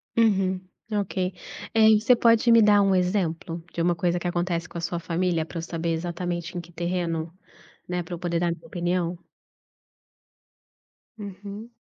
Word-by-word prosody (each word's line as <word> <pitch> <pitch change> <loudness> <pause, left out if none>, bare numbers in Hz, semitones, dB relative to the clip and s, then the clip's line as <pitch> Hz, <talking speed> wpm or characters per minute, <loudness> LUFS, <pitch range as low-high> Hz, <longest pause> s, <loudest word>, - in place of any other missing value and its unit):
Uhum, 195 -5 +3 0.3
ok. 205 -2 -2 0.6
Eh, 220 -1 +6
você 230 +4 +5
pode 230 0 +4
me 230 0 +8
dar 210 -1 +6
um 195 -1 +3
exemplo 180 -2 -1
de 170 - -2
uma 175 +1 +2
coisa 175 +1 0
que 175 - -3
acontece 175 -1 -1
com - - -8
a - - -3
sua 170 0 -2
família 170 -1 0
pra 170 - -8
eu - - -2
saber 165 0 -3
exatamente 175 +1 -3
em - - -2
que 175 +1 -16
terreno, 170 -1 -2 0.6
né, 180 0 -2
pra 170 - -8
eu - - -10
poder 170 -1 -1
dar 175 0 +1
minha 170 - -7
opinião? 175 0 -1 2.0
Uhum. 205 +2 -8
175 Hz, 165 wpm, -25 LUFS, 170-200 Hz, 2.0 s, me